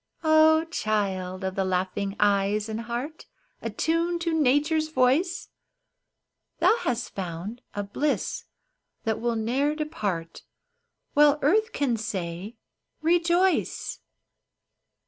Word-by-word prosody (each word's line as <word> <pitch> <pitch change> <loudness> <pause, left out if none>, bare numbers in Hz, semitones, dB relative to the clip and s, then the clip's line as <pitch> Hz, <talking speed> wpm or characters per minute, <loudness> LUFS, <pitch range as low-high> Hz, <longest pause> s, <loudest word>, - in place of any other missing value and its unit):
Ah, 315 0 +5
child 190 - -1
of 190 0 -2
the 195 - 0
laughing 190 +2 -1
eyes, 205 +1 +2
and 220 +1 -4
heart 240 +7 -5 0.3
Attuned 335 +1 0
to 335 -1 0
Nature's 310 +2 +2
voice! 310 +6 +1 1.1
Thou - - +4
hast 245 - -2
found 190 +5 -5
a 205 - -2
bliss 285 +9 -2 0.6
that 220 -1 -1
will 235 0 0
ne'er 260 +7 0
depart 200 - -3 0.7
While 295 0 +5
earth 435 +10 +3
can 265 - 0
say, 190 0 -4 0.2
" - - -52
Rejoice 345 +2 +1
240 Hz, 105 wpm, -26 LUFS, 200-315 Hz, 1.1 s, Ah